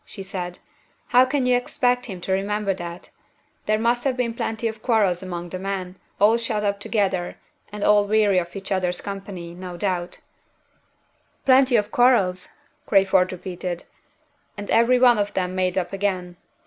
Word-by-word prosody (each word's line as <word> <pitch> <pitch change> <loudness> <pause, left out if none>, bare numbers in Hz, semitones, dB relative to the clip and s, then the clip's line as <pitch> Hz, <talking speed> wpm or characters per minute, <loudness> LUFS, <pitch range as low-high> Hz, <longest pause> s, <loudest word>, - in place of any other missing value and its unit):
she 195 - -8
said; 180 -2 -5 0.5
"how 250 +1 +6
can 265 0 0
you 250 0 +4
expect 245 0 0
him 190 -5 -7
to 185 - -5
remember 200 +1 0
that? 175 -1 -8 0.6
There 215 0 +3
must 235 +2 +1
have 260 -2 0
been 235 -2 -1
plenty 225 0 -2
of 220 -1 -6
quarrels 205 -7 +2
among 175 -2 -6
the 185 - -5
men, 190 -1 -4 0.2
all 215 +3 +5
shut 225 -2 -2
up 200 -1 0
together, 195 -4 -1 0.3
and 210 0 -5
all 210 -1 +5
weary 205 -3 +3
of 175 +1 -6
each 195 0 -7
other's 180 -2 0
company, 195 -4 -7
no 180 0 -8
doubt." 180 -2 -2 1.3
"Plenty 260 -1 +5
of 210 -1 +1
quarrels!" 200 -8 +3 0.4
Crayford 190 -2 +3
repeated; 180 -1 -5 0.7
"and 205 0 -6
every 235 +2 +4
one 245 -3 +5
of 205 0 -2
them 185 -1 -1
made 185 0 0
up 180 0 -2
again." 185 -3 -2
200 Hz, 165 wpm, -23 LUFS, 180-225 Hz, 1.3 s, how